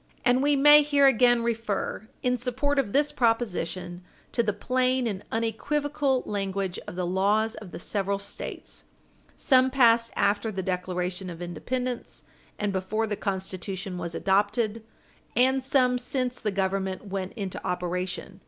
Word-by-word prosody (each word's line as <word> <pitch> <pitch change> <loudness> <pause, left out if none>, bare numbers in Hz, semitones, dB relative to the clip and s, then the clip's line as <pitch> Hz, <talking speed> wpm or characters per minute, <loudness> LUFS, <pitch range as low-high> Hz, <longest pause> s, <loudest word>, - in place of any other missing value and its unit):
And 250 0 +4
we 290 +1 +3
may 295 +2 +8
here 285 -1 +3
again 240 -2 +5
refer 220 -2 -2 0.2
in 250 -1 +2
support 260 +4 0
of 230 -7 0
this 290 +4 +2
proposition 185 -7 -1 0.3
to 235 - +2
the 215 -2 +1
plain 255 +4 0
and 200 -4 -3
unequivocal 280 +4 0
language 195 -2 -2
of - - -7
the 180 0 -1
laws 205 +5 +1
of 210 -4 -9
the - - -8
several 200 +2 -1
States, 200 +1 -6 0.5
some 260 -1 +4
passed 235 -3 +4
after 205 +2 +1
the 190 -2 -4
Declaration 180 0 -3
of 170 -1 -8
Independence 245 +9 -4 0.3
and 205 -1 -1
before 195 +4 -1
the 210 -1 -2
Constitution 190 -1 -4
was 170 -1 -4
adopted 210 +3 +1 0.5
and 260 +2 +3
some 255 -2 +2
since 250 0 -2
the 215 - -1
Government 190 0 -1
went 190 -1 -4
into 195 -5 -5
operation. 180 +1 -3
215 Hz, 145 wpm, -27 LUFS, 190-250 Hz, 0.5 s, may